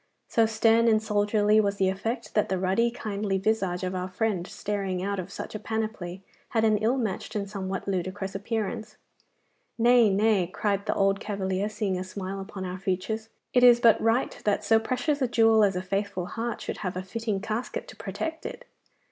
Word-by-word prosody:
So 225 -1 +3
stern 225 +1 +3
and 220 -1 +5
soldierly 210 0 +3
was 200 -1 0
the 195 -1 +2
effect, 225 +4 -3
that 210 - +2
the 190 - 0
ruddy, 190 +6 +2
kindly 205 -4 -2
visage 190 -3 0
of 185 0 -2
our 185 0 -2
friend 185 -2 -1
staring 195 -3 -3
out 200 0 -1
of 185 +1 -6
such - - -6
a 215 - -4
panoply 215 -5 -4 0.3
had 225 -2 +1
an 215 -1 +4
ill 230 +5 +2
matched 220 -2 -3
and 200 -1 -1
somewhat 195 -1 -4
ludicrous 190 +1 -2
appearance. 220 +2 -3 0.8
'Nay, 240 -1 +5
nay,' 200 -2 +3
cried 200 +2 -1
the - - +1
old 195 0 +2
cavalier, 200 -1 -2
seeing 210 -4 -2
a - - -3
smile 190 +1 -5
upon 195 -1 -6
our 185 0 -5
features, 195 +4 -2 0.2
'it 250 - +4
is 240 -1 +8
but 230 -2 +5
right 225 +3 +1
that 210 0 +1
so 225 +2 +4
precious 265 +6 -1
a 260 - +3
jewel 225 -2 +5
as 195 -2 +3
a 180 - -2
faithful 195 -1 -2
heart 230 +4 -4
should - - -4
have 185 -3 -4
a 185 - -3
fitting 215 +1 -2
casket 220 +5 -4
to - - -11
protect 320 0 -5
it. - - -7
205 Hz, 195 wpm, -27 LUFS, 190-225 Hz, 0.8 s, is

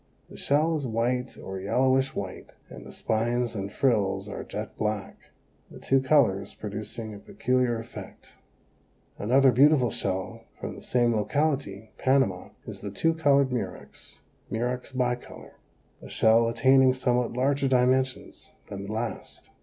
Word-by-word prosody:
The - - -11
shell 155 +4 +1
is 145 -4 -2
white 125 +3 -1
or 95 0 -6
yellowish 130 +7 +1
white - - -6 0.2
and - - -10
the - - -10
spines 120 +2 -1
and 100 -2 -4
frills 100 -6 +1
are 105 - -6
jet - - -6
black, 105 -2 -4 0.4
the - - -12
two 135 0 +2
colors 130 -9 +2
producing 110 +1 -6
a 100 - -9
peculiar 125 +2 0
effect. 115 +1 -10 0.9
Another 130 +5 +4
beautiful 135 0 +4
shell 95 0 -3
from - - -5
the - - -11
same 120 -2 +1
locality 110 -4 -1
(Panama) 130 -9 +1 0.2
is - - -8
the 100 - -5
Two 165 +12 +1
colored 140 -4 +3
Murex 100 -8 -6 0.3
(Murex 125 +4 -3
bicolor), 125 -1 -3 0.5
a - - -11
shell 115 +1 +4
attaining 130 +2 +4
somewhat 125 -2 0
larger 135 +2 +1
dimensions 130 0 0 0.2
than 100 0 -6
the - - -5
last. 110 +2 -5
125 Hz, 140 wpm, -27 LUFS, 110-130 Hz, 0.9 s, Another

